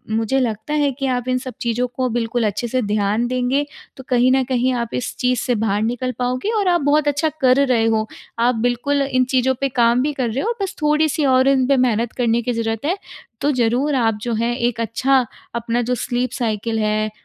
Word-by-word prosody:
मुझे 225 +4 +1
लगता 225 +2 -2
है 290 -2 +2
कि 270 +1 -4
आप 250 -1 -1
इन 255 0 +1
सब 255 0 -6
चीज़ों 240 +1 0
को 255 +1 -2
बिल्कुल 235 0 -1
अच्छे 210 +4 -2
से 255 +2 0
ध्यान 210 +1 0
देंगे, 255 +3 0 0.3
तो 265 - -9
कहीं 250 0 +3
न 265 0 +3
कहीं 255 0 0
आप 235 -2 -2
इस 250 - -3
चीज़ 250 -1 +1
से 245 - 0
बाहर 210 -2 0
निकल 245 +3 -1
पाओगे 250 - -1
और 400 - 0
आप 350 -2 +3
बहुत 290 +1 +2
अच्छा 290 +2 +1
कर 260 +2 +4
रहे 235 -3 +2
हो। 220 -1 +1 0.3
आप 240 +1 +3
बिल्कुल 245 +5 0
इन 260 -2 +1
चीज़ों 260 0 +2
पे 275 - +1
काम 240 -1 +3
भी 295 +3 0
कर 255 -4 -1
रहे 235 +5 -2
हो 455 - 0
बस 385 - -3
थोड़ी-सी 300 0 +2
और 260 0 +4
इन 270 -2 +3
पे 275 0 +3
मेहनत 235 -2 +1
करने 235 -1 +1
की 245 +1 -2
ज़रूरत 225 +1 -2
है। 345 +5 +1 0.5
तो 290 - +2
ज़रूर 255 +3 +1
आप 225 -4 +1
जो 235 +1 -2
हैं 235 +2 0
एक 240 -2 -1
अच्छा 255 +5 +2 0.4
अपना 235 +1 -1
जो 250 - +2
स्लीप 245 0 -2
साइकिल 225 -1 -1
है 215 0 0
250 Hz, 225 wpm, -20 LUFS, 230-265 Hz, 0.5 s, कर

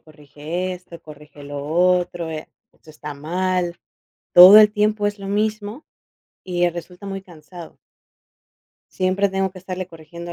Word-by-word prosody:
corrige 155 +4 -6
esto, 180 -2 -11
corrige 150 -1 -14
lo 140 0 -7
otro, 175 0 +1
eh, 155 -1 -7 0.2
esto 160 - -26
está 150 -1 -8
mal". 175 +3 -2 0.5
Todo 185 +4 +10
el 210 -1 +7
tiempo 210 -1 0
es 205 - -7
lo 195 - -8
mismo 215 +5 -3 0.6
y 175 -1 0
resulta 180 +3 -10
muy 195 -1 -5
cansado. 175 -1 -13 1.1
Siempre 190 +2 0
tengo 190 0 -1
que 185 - -13
estarle 185 0 -6
corrigiendo 170 0 -10
180 Hz, 140 wpm, -21 LUFS, 160-195 Hz, 1.1 s, Todo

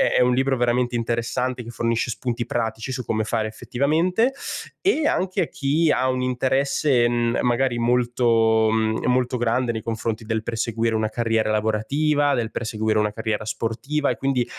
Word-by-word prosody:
è - - +4
un 125 0 +4
libro 130 +1 +1
veramente 120 0 +1
interessante 120 +2 -2
che 115 - -10
fornisce 115 0 -1
spunti 120 0 -3
pratici 115 +1 -3
su 125 -1 -3
come 110 -1 0
fare 110 0 -1
effettivamente 165 - 0 0.5
e 320 -5 +2
anche 190 - 0
a - - -4
chi 150 +4 +1
ha 130 -3 +2
un 130 0 -1
interesse, 130 0 +1
mhmm, 120 -1 0
magari 125 0 +1
molto 115 -2 +2
mhmm, 110 0 0
molto 125 0 +1
grande 120 +1 +1
nei 110 - -4
confronti 115 0 -3
del 110 0 -2
perseguire 115 0 -1
una 110 0 +1
carriera 115 -1 0
lavorativa, 140 +8 +1
del 115 -1 -2
perseguire 110 -1 -1
una 105 0 +1
carriera 110 -1 -2
sportiva 115 +7 -2
e - - -1
quindi 135 -3 0
120 Hz, 165 wpm, -23 LUFS, 110-130 Hz, 0.5 s, è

